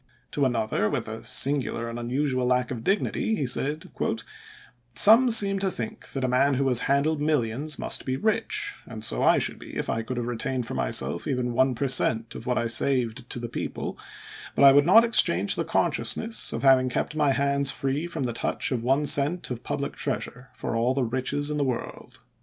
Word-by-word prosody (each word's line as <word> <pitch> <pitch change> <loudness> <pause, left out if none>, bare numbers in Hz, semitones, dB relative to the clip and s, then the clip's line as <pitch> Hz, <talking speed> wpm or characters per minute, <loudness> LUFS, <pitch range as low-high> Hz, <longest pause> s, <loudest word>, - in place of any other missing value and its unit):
To 140 - 0
another, 110 -4 0
with - - -3
a 110 0 -7
singular 135 -4 0
and 115 +1 -6
unusual 130 +1 -1
lack 125 0 +1
of 115 -3 -5
dignity, 210 - 0
he 145 - -2
said: 145 +5 -2 0.5
" 120 -1 -21
Some 225 - +7
seem 200 -4 +4
to 190 0 0
think 220 +3 -6
that 135 - -3
a - - +1
man 130 +3 +2
who 135 +1 0
has 125 -2 +3
handled 145 +2 +1
millions 145 0 -1
must - - -2
be 130 0 -2
rich, 410 - 0
and 110 -2 -9
so - - +2
I - - +4
should - - -1
be - - -11
if - - -2
I 115 - -1
could 120 +3 -6
have 120 - -2
retained 125 +1 -3
for - - -6
myself 70 +6 0
even 125 -3 -1
one 130 +1 +2
per 140 +4 -1
cent, 115 -3 0
of 120 - -9
what 125 - 0
I 120 - 0
saved 120 +1 0
to - - -3
the 120 0 -5
people; 115 - -5 0.6
but - - +2
I 135 - +10
would 145 +3 +4
not 225 +6 +7
exchange 235 0 +4
the - - -1
consciousness 225 0 0
of - - -5
having 130 -1 +5
kept 140 - -3
my 150 -2 +2
hands 140 0 0
free 135 +6 -2
from 165 -5 -4
the 120 -2 -2
touch - - -2
of 125 -3 -1
one 135 +5 +1
cent 145 +3 +1
of 120 -1 -5
public 140 0 -4
treasure 125 -2 -4
for - - -4
all 120 +3 +1
the 135 - 0
riches 130 +5 -2
in 150 - -2
the 145 - +1
world." 125 -3 -5
130 Hz, 210 wpm, -25 LUFS, 120-145 Hz, 0.6 s, I